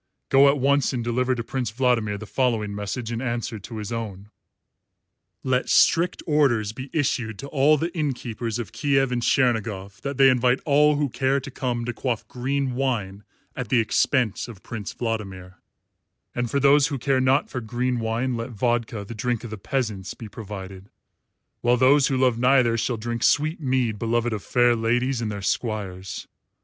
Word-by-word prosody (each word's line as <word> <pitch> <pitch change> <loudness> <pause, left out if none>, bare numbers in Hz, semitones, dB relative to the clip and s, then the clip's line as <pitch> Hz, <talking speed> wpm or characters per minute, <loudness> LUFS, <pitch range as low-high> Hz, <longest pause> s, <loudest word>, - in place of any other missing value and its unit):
Go 140 +1 +6
at 140 - +2
once 140 +1 +2
and 120 -2 -2
deliver 125 +2 0
to 115 - -4
Prince 125 -1 -3
Vladimir 115 -3 +1
the 110 - -8
following 110 -2 0
message 105 +3 -4
in 115 0 -3
answer 120 -3 -3
to 110 +3 -9
his 105 +1 -5
own: 105 -3 -6 1.1
"Let 130 0 0
strict 170 +2 +3
orders 135 -9 +2
be 130 +3 -8
issued 120 -7 -1
to 140 - -7
all 145 +2 +4
the 165 +4 -3
inn 150 -4 0
keepers 115 -2 -4
of 115 -3 -5
Kiev 135 +2 +1
and 120 -1 -1
Chernigof 110 -6 0
that 140 -1 -4
they 135 -1 +7
invite 125 +1 +2
all 150 +1 +4
who 145 0 +1
care 135 +2 0
to 135 +1 -9
come 120 -2 -2
to 120 - -3
quaff 120 0 -3
green 135 +1 -2
wine 110 -7 -2 0.3
at 125 -4 -5
the 125 - +3
expense 115 0 +1
of 110 -6 -12
Prince 110 -4 -6
Vladimir; 95 -6 -5 0.7
and 120 -1 -2
for 140 - +1
those 140 +1 +5
who 145 -4 -3
care 130 +1 +1
not 130 +2 +3
for 125 - -3
green 120 +2 -1
wine 115 +3 -1
let 115 +2 -4
vodka, 115 -2 -1
the 115 - -7
drink 120 +1 -2
of 115 - -7
the 110 - -5
peasants, 105 -6 -3
be 115 - -9
provided; 100 -2 -9 0.7
while 120 +1 +3
those 135 +3 +5
who 135 - 0
love 125 -3 +2
neither 125 -2 +4
shall 115 +1 -1
drink 115 +1 -4
sweet 155 +6 +2
mead 125 -6 0
beloved 120 0 0
of 105 - -3
fair 120 +1 +3
ladies 120 +3 0
and 110 -2 -2
their 100 -1 -6
squires. 95 -3 -3
120 Hz, 185 wpm, -24 LUFS, 110-130 Hz, 1.1 s, they